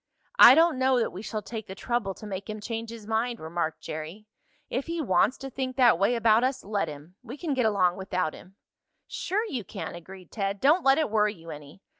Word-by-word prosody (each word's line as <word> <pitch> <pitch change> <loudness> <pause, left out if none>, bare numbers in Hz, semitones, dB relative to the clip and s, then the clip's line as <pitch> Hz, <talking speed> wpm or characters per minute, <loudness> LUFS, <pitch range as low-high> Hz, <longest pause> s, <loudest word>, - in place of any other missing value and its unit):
"I 245 - +11
don't 325 -4 +4
know 260 0 +3
that 230 - -1
we 185 - -8
shall 215 -1 -5
take 220 0 -7
the 190 - -8
trouble 205 -3 -2
to - - -11
make 200 0 -6
him 215 0 -5
change 225 +1 -5
his 230 -2 -9
mind," 230 +2 -1
remarked 160 0 -3
Jerry. 155 +7 -7 0.4
"If 265 +5 -3
he 335 0 -3
wants 230 - +2
to 270 - -7
think 255 0 -4
that 245 -9 +5
way 200 +5 +2
about 230 0 +4
us, 260 +1 -1
let 205 0 -1
him. 150 +5 -11
We - - -9
can 310 -2 -2
get 250 -4 +2
along 185 -4 +2
without 185 -4 -2
him." 190 - -14 0.5
"Sure 420 +5 -2
you 260 - -4
can!" - - -7
agreed 185 +2 -12
Ted. 200 -2 -2
"Don't 305 - +4
let 270 +1 +5
it 310 -8 0
worry 210 -1 +2
you 165 -2 -11
any. 150 +5 -12
215 Hz, 225 wpm, -27 LUFS, 185-255 Hz, 0.5 s, I